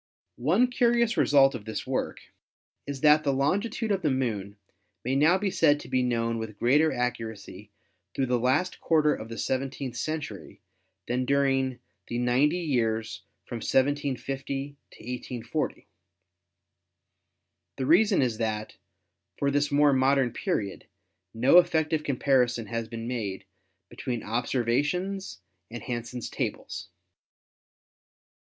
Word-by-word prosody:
"One 175 - +4
curious 235 -2 +2
result 135 -1 +5
of 115 -5 -7
this 110 - -4
work - - -2 0.7
is 140 -2 -5
that 150 0 +6
the 140 - +2
longitude 205 - 0
of 195 -1 +1
the 155 - +1
Moon 110 -7 -2 0.5
may 130 +2 0
now 155 +6 +5
be 195 0 -1
said 145 -4 +3
to - - -11
be 130 0 +1
known 115 -2 0
with 110 -2 -6
greater 145 +8 +3
accuracy 110 -5 -4 0.5
through 135 - +1
the 125 -1 +1
last 135 +9 +1
quarter 155 -2 +3
of 110 - -7
the 115 - -7
seventeenth 130 -1 -3
cen 155 +5 -2
tury 100 - -9 0.5
than 125 +1 0
during 135 -1 +1 0.3
the 120 - -3
ninety 125 +7 +2
years 115 -7 -1 0.2
from 120 - -5
1750 135 +1 -1
to - - -17
1840. 125 0 -4 1.9
The 130 - -2
reason 185 +3 +4
is 120 -3 -1
that, 110 -1 -3 0.6
for 140 0 +1
this 145 +1 +1
more 145 0 +4
modern 135 -1 +3
period, 100 -2 -3 0.4
no 125 +10 +6
effective 160 -2 +1
comparison 125 -4 +1
has 115 +1 -4
been 115 0 -6
made 110 -6 -4 0.4
between 120 -4 -5
observations 135 - -1 0.3
and 120 +1 -7
Han 120 -3 -3
sen's 120 0 -6
tables." - - -4
130 Hz, 130 wpm, -27 LUFS, 120-150 Hz, 1.9 s, that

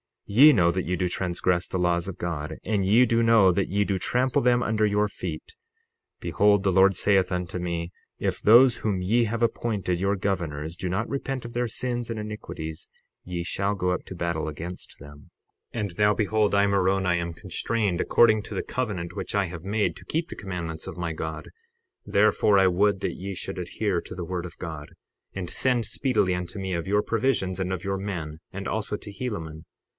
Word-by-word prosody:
60:33 100 - -7
Ye 150 +3 +9
know 85 -7 +4
that 90 +1 -2
ye 90 - -1
do 90 0 -1
transgress 90 0 0
the - - -3
laws 85 -1 +1
of 95 - -6
God, 80 -4 -4
and 105 -3 0
ye 115 +6 +5
do 115 -1 +2
know 115 -5 +5
that 95 +2 0
ye 100 +2 +1
do 100 -2 -1
trample 125 +6 +1
them 120 0 +3
under 110 0 +1
your 105 0 +2
feet. 455 - -6 0.7
Behold, 100 -1 +3
the 95 - +2
Lord 95 +1 +5
saith 95 -2 +3
unto 90 0 -3
me: 85 -1 -3 0.3
If - - -2
those 120 +3 +7
whom 105 -5 -1
ye 115 +6 +2
have 115 +2 -2
appointed 105 -6 -1
your 100 +2 +1
governors 85 -5 -2
do 95 - -4
not 105 +6 -1
repent 135 -2 -3
of 120 - -7
their 120 0 0
sins 120 +1 -3
and 115 - -3
iniquities, 105 -7 -6 0.4
ye 90 -1 -3
shall 100 +3 -1
go 90 -2 0
up 90 - -3
to 95 - -8
battle 85 -2 -2
against 80 +4 -7
them. 70 0 -13 0.5
60:34 115 - -1
And 100 -5 -4
now 105 0 +5
behold, 105 -1 +1
I, 100 0 +4
Moroni, 95 -2 +2
am 85 0 -3
constrained, 105 +1 -1
according 110 0 +4
to - - -7
the - - -2
covenant 100 -9 -3
which - - -4
I 100 -1 +2
have 85 0 -8
made 105 +1 0
to - - -13
keep 165 +2 -2
the - - -5
commandments 85 -5 -5
of - - -7
my 85 -1 -2
God; 80 0 -5 0.6
therefore 105 0 +3
I 95 -1 +5
would 95 +2 +2
that - - -2
ye 95 +1 -6
should 95 0 -4
adhere 90 +1 -1
to - - -9
the 85 - -5
word 90 0 -3
of 90 - -10
God, 80 -3 -7 0.4
and 90 -3 -5
send 125 -3 +2
speedily 125 -9 +1
unto 90 +3 -4
me 95 -1 -3
of 85 0 -3
your 105 +1 +2
provisions 110 -6 0
and 95 0 -2
of 90 -1 -4
your 95 0 -1
men, 85 -6 -5
and 100 +1 -6
also 110 -1 -2
to 105 - -9
Helaman. 85 -8 -5
95 Hz, 210 wpm, -26 LUFS, 90-110 Hz, 0.7 s, Ye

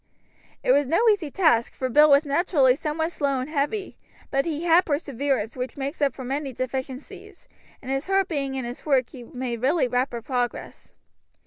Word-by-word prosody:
It - - +3
was 285 +1 +3
no 340 - +2
easy 390 -8 +1
task, 280 -9 +2
for 260 - -2
Bill 300 +4 +5
was 280 +2 +5
naturally 285 -3 +3
somewhat 320 +3 -2
slow 280 -5 -1
and 255 - -4
heavy; 305 +7 -2 0.3
but 275 0 +1
he 315 0 -3
had 345 +1 +5
perseverance, 280 -6 -2
which 255 +1 -5
makes 280 +3 -4
up 280 -1 +2
for 260 - -7
many 270 +1 -3
deficiencies, 260 +2 -6 0.4
and 260 - -5
his 270 +3 -2
heart 390 -1 +2
being 275 -5 -2
in 260 -2 -3
his 240 +1 -7
work 265 -5 +2
he 255 - -10
made 240 -1 -5
really 280 +2 +2
rapid 245 -2 -2
progress. 245 -2 -3
275 Hz, 185 wpm, -24 LUFS, 255-305 Hz, 0.4 s, Bill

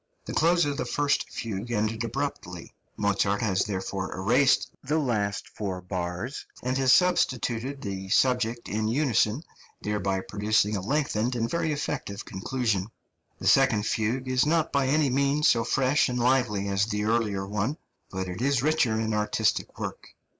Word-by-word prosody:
The - - -5
close 170 +1 +3
of 145 -1 -2
the - - -2
first 145 +4 0
fugue 110 0 -5
ended 110 0 -1
abruptly; 115 -8 -4 0.2
Mozart 100 0 +1
has 95 -3 +1
therefore 95 -1 -3
erased 125 +9 +3
the 150 +3 0
last 105 -9 -1
four 95 -3 -4
bars, 90 +7 -5 0.2
and 125 +1 -1
has 130 -2 +4
substituted 130 -5 +2
the 95 -1 -5
subject 120 0 +1
in 110 +1 -1
unison, 125 0 +1 0.4
thereby 100 -2 -1
producing 105 +1 +1
a 100 - -2
lengthened 125 0 0
and 115 -1 0
very 165 +4 -1
effective 140 -8 -4
conclusion. 105 -1 -2 0.5
The - - -8
second 105 -1 +4
fugue 115 +5 -1
is 130 0 +2
not 160 +1 +1
by 140 -2 +1
any 145 0 +2
means 140 +3 +2
so 115 -1 +3
fresh 135 +4 +2
and 125 - -2
lively 120 -5 +1
as 100 +1 +1
the 105 -2 -2
earlier 105 -3 0
one, 105 +9 -2 0.3
but 95 -1 -4
it 90 +4 -5
is 135 -1 +2
richer 140 -8 +2
in 110 0 -1
artistic 105 0 0
work. - - -6
115 Hz, 160 wpm, -27 LUFS, 100-135 Hz, 0.5 s, has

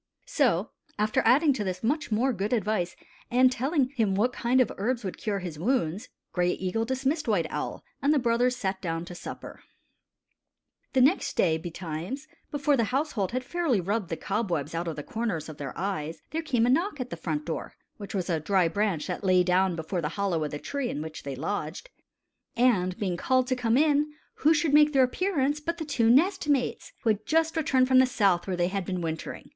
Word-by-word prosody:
So, 255 - +1 0.3
after 215 +1 +2
adding 280 +6 +5
to 230 -5 -2
this 185 0 -4
much 295 +3 0
more 245 +5 +2
good 205 +2 -2
advice 210 -6 0 0.3
and 255 +1 +5
telling 265 +2 +1
him 225 -8 0
what 240 +5 +1
kind 245 +2 +1
of 255 - +3
herbs 240 +3 -1
would 190 - -5
cure 210 -2 -1
his 175 -5 -6
wounds. 210 -1 0 0.2
Gray 180 0 +2
Eagle 190 +5 -2
dismissed 265 +5 -1
White 200 -7 +2
Owl, - - -4 0.2
and 280 - +3
the 305 - +4
brothers 245 0 +2
sat 190 -5 -3
down 165 -2 -3
to 180 - -9
supper. 175 - -8 1.3
The 260 - +4
next 285 +9 +2
day, 160 -3 +3
betimes, 175 - -5 0.2
before 290 -1 +1
the 230 -4 +2
household 250 - -1
had 255 +1 -2
fairly 315 - 0
rubbed 200 +1 -2
the 165 - -3
cobwebs 175 -8 -2
out 170 +1 -2
of 165 - -3
the 150 - -6
corners 205 -8 -3
of 155 -2 -9
their 140 -3 -6
eyes, 165 -4 -3
there 325 - -1
came 250 -7 +1
a - - +2
knock 330 +3 +1
at 250 -1 -4
the - - -3
front 155 -2 -3
door 165 - -5 0.2
which 205 -1 -7
was 185 -3 -1
a 165 -4 0
dry 185 +2 +2
branch 195 -2 0
that 180 +2 -4
lay 185 -1 +4
down 180 0 +2
before 170 +2 -3
the 150 - -1
hollow 190 -6 0
of 150 - -2
the 145 - -5
tree 275 - -3
in 150 - -3
which 160 0 -7
they 140 -1 -5
lodged 165 - -4 0.7
and 195 -7 +2
being 185 -4 -2
called 255 +6 +2
to 255 - 0
come 240 -1 +1
in, 300 0 +3 0.3
who 305 - +4
should 310 -2 +2
make 300 0 +6
their 270 -1 +5
appearance 290 0 0
but 335 +3 -3
the 320 - -4
two 235 -6 +2
nest 330 - +3
mates, 280 - 0
who 225 - +4
had 215 0 -2
just 325 +1 +2
returned 265 -5 +2
from 260 0 +6
the 260 - +5
South 195 -8 +2
where 185 -2 -2
they 175 0 +2
had 195 0 -2
been 180 0 -3
wintering. 160 -1 -5
220 Hz, 215 wpm, -27 LUFS, 180-265 Hz, 1.3 s, make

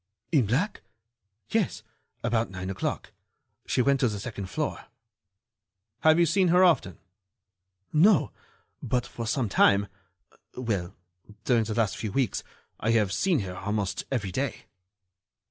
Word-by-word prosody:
"In 135 -10 +3
black? 150 - 0 0.7
Yes, 215 - 0 0.4
about 115 -3 +1
nine 95 0 -5
o'clock. 95 - -3 0.6
She 125 - +2
went 140 0 +3
to 130 - +3
the 105 -3 -3
second 100 -3 -6
floor." - - -3 1.1
"Have 160 0 +5
you 170 - +5
seen 185 +3 +3
her 180 +2 +5
often?" 160 - +3 1.0
"No, 175 +1 +5 0.5
but 125 +2 -1
for 115 -1 -6
some 130 -2 0
time—well, 100 +1 -1 0.5
during 120 -3 +3
the 110 0 -3
last 115 -4 +1
few 110 - -4
weeks, 130 +2 0 0.4
I 110 - -1
have 105 -4 +2
seen 175 - +2
her 90 -2 -6
almost 100 0 -2
every 105 -8 -1
day." 135 +6 -3
115 Hz, 130 wpm, -27 LUFS, 100-140 Hz, 1.1 s, Have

